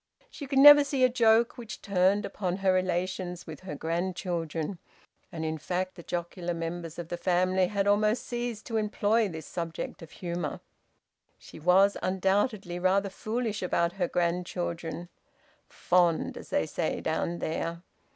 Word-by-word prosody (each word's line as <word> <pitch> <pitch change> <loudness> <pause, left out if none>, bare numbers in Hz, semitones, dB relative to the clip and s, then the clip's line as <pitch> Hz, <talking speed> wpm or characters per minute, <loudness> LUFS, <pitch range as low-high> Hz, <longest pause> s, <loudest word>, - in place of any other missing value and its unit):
She 285 - -8
could 275 0 -1
never 290 +1 +10
see 275 -2 0
a 255 - +6
joke 235 0 +3
which 225 -3 -7
turned 200 +1 +2
upon 185 -3 -3
her 190 - +5
relations 185 -1 -2
with 155 -3 -8
her 185 -5 -7
grandchildren, 170 0 -3 0.5
and 160 -2 -4
in 160 0 -2
fact 185 +3 -2
the 170 - -11
jocular 175 0 -4
members 165 0 -5
of 170 -1 -6
the 175 - -3
family 185 +1 +2
had 200 0 -1
almost 210 +3 +2
ceased 240 -2 -4
to 225 - -2
employ 215 0 +1
this 160 -3 -7
subject 165 -2 -5
of 165 - -10
humour. 170 -3 -4 0.8
She - - -13
was 190 +5 +4
undoubtedly 190 0 0
rather 195 +2 +2
foolish 220 +2 -3
about 170 -2 +1
her 180 -1 -1
grandchildren 175 -1 -2 0.6
`fond,' 175 -2 +1
as - - -10
they 80 - +1
say - - -2
down 170 0 -1
there. 165 +1 -3
185 Hz, 150 wpm, -28 LUFS, 170-205 Hz, 0.8 s, never